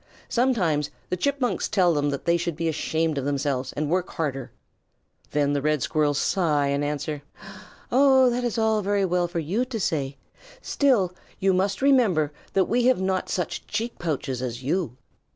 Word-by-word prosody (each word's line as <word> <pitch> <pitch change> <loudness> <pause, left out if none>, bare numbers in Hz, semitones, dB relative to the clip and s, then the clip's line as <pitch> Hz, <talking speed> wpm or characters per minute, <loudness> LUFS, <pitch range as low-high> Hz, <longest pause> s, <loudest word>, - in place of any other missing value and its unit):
Sometimes 180 - +1 0.2
the - - +2
Chipmunks 250 -2 -1
tell 180 -4 +3
them 145 -1 +1
that 140 -1 -4
they 170 - +3
should 170 -1 -2
be 165 +1 -2
ashamed 160 -1 0
of 135 - -4
themselves 140 -2 -1
and 150 0 -2
work 180 +3 0
harder. 135 -6 -3 0.8
Then 145 -1 +1
the 145 - 0
Red 150 -1 +1
Squirrels 150 -2 +1
sigh 150 -7 +1
and 140 +1 0
answer, 150 0 -3 0.7
"Oh, 265 0 +5
that 245 +1 -1
is 240 -1 -1
all 220 -1 +2
very 200 0 +1
well 180 -1 +1
for 175 0 -6
you 175 +10 0
to 250 -3 -5
say, 140 -7 -1 0.4
still 245 - +2 0.2
you 190 0 +2
must 195 +5 0
remember 205 - +3 0.2
that 190 -1 +3
we 240 +4 +1
have 255 -4 +4
not 190 0 -1
such 180 -3 -3
cheek 230 +3 -3
pouches 135 -6 -2
as 125 0 -4
you." 145 -3 -1
170 Hz, 175 wpm, -25 LUFS, 145-210 Hz, 0.8 s, Oh